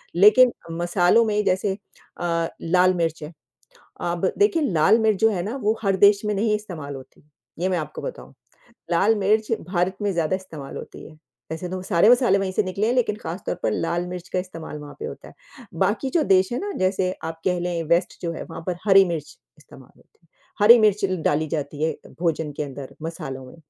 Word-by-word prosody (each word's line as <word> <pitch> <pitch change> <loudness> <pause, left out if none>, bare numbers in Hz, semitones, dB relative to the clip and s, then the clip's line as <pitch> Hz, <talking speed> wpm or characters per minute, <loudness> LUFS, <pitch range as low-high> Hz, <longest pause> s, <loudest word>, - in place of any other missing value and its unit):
लेकिन 215 +7 +7 0.3
मसालों 175 +6 +3
में 210 -1 0
जैसे 190 +1 +1 0.5
अ, 170 -1 0
लाल-मिर्च 170 -2 +1
है 155 +3 -8 0.7
अब 175 +2 0
देखिए 405 -6 +3
लाल 165 +8 +4
मिर्च 215 -3 +2
जो 225 0 +5
है 180 -4 -2
ना 220 +8 -4
वो 215 +2 +1
हर 195 -1 +1
देश 200 +2 +5
में 210 0 0
नहीं 210 +1 +1
इस्तेमाल 165 -9 -6
होती, 130 -1 -13 0.4
ये 185 +2 0
मैं 180 -2 0
आपको 155 -1 -6
बताऊँ। - - -8 0.6
लाल-मिर्च 215 +4 +2 0.2
भारत 180 0 0
में 205 -1 0
ज़्यादा 170 +1 0
इस्तेमाल 160 -7 -9
होती - - -10
है, 155 - -14 0.3
ऐसे 175 +2 -5
तो 185 0 -4
सारे 185 +2 +3
मसाले 245 -6 +5
वहीं 190 -1 -2
से 210 - +1
निकले 195 +4 -1
हैं, 245 - +1
लेकिन 230 -5 +1
खास 180 -3 -6
तौर - - -2
पर - - +1
लाल-मिर्च 175 +1 -3
का 185 - -1
इस्तेमाल 165 -4 -7
वहाँ 145 0 -10
पे 445 - -4
होता 465 - -9
है, - - -14 0.4
बाकी 200 +9 0
जो 325 -1 +2
देश 190 -1 +3
है - - -1
ना 405 +1 -4
जैसे 185 0 +1
आप 165 0 -5
कह 180 -1 +1
लें 175 -1 -2
वेस्ट 170 +2 +1
जो 170 -1 -2
है, - - -6
वहाँ - - -9
पर 180 -1 -2
हरी 195 0 +7
मिर्च 165 -4 -5 0.2
इस्तेमाल 135 -3 -17
होती - - -28
है, - - -30 0.4
हरी 235 +1 +9
मिर्च 210 -2 +3 0.2
डाली 155 +2 +1
जाती 145 -1 -4
है 160 - +2 0.3
भोजन 160 -3 -1
के 150 - -1
अंदर, 135 -1 -9
मसालों 135 -5 -6
में, 130 - -13
185 Hz, 205 wpm, -23 LUFS, 165-210 Hz, 0.7 s, हरी